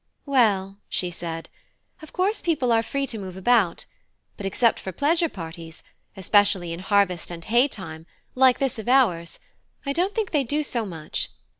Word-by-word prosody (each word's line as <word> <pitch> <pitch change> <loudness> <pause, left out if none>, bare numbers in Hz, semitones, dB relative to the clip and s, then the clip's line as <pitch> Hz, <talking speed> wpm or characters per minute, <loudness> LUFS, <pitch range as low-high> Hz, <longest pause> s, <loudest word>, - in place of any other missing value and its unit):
"Well," 205 -8 +2
she 180 -1 -1
said, 165 -1 -6 0.5
"of 315 - -12
course 390 +4 0
people 300 -8 +1
are 225 -1 +4
free 275 +4 -2
to 235 -5 -4
move 185 -2 -7
about; 195 -3 +2 0.5
but 195 - -4
except 230 +4 +2
for 190 - -6
pleasure 325 - +2
parties, 165 - -9 0.3
especially 195 -2 +2
in 170 - -6
harvest 190 -2 +1
and 170 -1 -8
hay 240 +4 +4
time, 165 - -8 0.3
like 255 -1 +5
this 270 -4 -1
of 220 - -4
ours, 185 -11 +3 0.5
I 280 - -1
don't 370 +6 0
think 440 -3 -1
they 295 -3 +2
do 295 +4 0
so 235 -6 -2
much. 160 -4 -4
210 Hz, 170 wpm, -24 LUFS, 175-270 Hz, 0.5 s, like